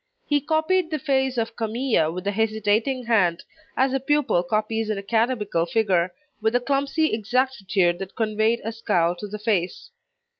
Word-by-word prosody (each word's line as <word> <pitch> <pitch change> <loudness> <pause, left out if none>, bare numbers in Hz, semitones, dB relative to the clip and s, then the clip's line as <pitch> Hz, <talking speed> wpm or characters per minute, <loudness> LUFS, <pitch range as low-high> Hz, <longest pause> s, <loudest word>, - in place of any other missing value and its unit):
He 290 -1 +1
copied 320 +4 +1
the 310 - -1
face 265 -3 0
of 230 0 -2
Camille 225 -7 0
with 180 +3 -6
a 200 - +1
hesitating 220 +4 0
hand, 185 -7 +2 0.3
as 265 0 +2
a 270 - +1
pupil 275 -8 +1
copies 215 +4 -1
an 215 - -1
academical 210 -4 0
figure, 185 -4 +1 0.3
with 220 +2 +1
a - - +5
clumsy 280 +4 0
exactitude 215 -6 +1
that 195 0 -7
conveyed 220 +1 +1
a 225 - -3
scowl 180 -6 0
to 210 - -6
the 210 +1 -6
face. 210 - -2
225 Hz, 160 wpm, -24 LUFS, 200-265 Hz, 0.3 s, a